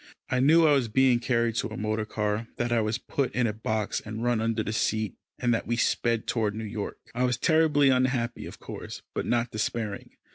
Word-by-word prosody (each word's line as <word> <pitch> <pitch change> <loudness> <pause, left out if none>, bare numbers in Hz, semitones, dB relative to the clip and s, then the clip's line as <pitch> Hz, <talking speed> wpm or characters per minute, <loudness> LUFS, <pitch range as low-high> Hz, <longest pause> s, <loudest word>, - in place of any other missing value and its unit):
I 125 - +2
knew 160 +5 +6
I 155 - +5
was 135 -4 +2
being 125 +2 +4
carried 115 -2 +1
to - - 0
a 110 - -7
motor 110 +1 -1
car, 105 +1 -2
that 120 0 -1
I 120 -1 +3
was 110 +1 0
put 140 -3 -2
in 125 - +2
a 110 - 0
box 110 -1 -2
and 110 +1 -5
run 120 -2 +1
under 115 -1 0
the 105 - -3
seat, 110 -2 0 0.2
and 120 -1 +1
that 115 - -2
we 120 - +1
sped 115 -1 +1
toward 110 -3 0
New 110 - -4
York. 105 -1 -5 0.2
I 125 +2 0
was 125 -1 +1
terribly 155 -3 +4
unhappy, 130 -2 +1
of - - -10
course, - - -8
but - - -3
not 120 0 +1
despairing. 110 -1 -3
115 Hz, 220 wpm, -27 LUFS, 110-125 Hz, 0.2 s, knew